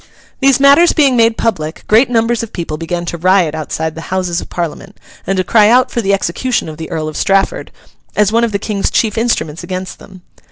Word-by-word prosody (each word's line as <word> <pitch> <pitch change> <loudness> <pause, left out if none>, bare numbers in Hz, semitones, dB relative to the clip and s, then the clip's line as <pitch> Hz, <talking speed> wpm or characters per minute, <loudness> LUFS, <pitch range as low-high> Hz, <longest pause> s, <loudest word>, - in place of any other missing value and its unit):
These 270 -1 +3
matters 280 +5 +5
being 280 -5 +3
made 230 -1 +3
public, 160 -9 -2
great 225 +5 +4
numbers 230 -1 +1
of 230 - -7
people 165 -3 -4
began 170 +2 -4
to 170 0 -5
riot 185 -2 +2
outside 160 0 -4
the 165 0 -9
Houses 180 -2 -1
of - - -11
Parliament, 175 +4 -6 0.3
and 195 - 0
to 185 - +1
cry 210 +2 +4
out 255 +2 +3
for 235 - -1
the 200 -2 0
execution 200 +6 -1
of 155 -1 -8
the 160 0 -7
Earl 155 -1 -3
of 155 - -6
Strafford, 195 0 0 0.4
as 210 -1 +2
one 230 +1 +2
of 230 - 0
the 200 - 0
King's 200 -1 -2
chief 215 -3 0
instruments 175 -9 -1
against 185 0 -6
them. 185 -2 -15
195 Hz, 215 wpm, -14 LUFS, 170-230 Hz, 0.4 s, matters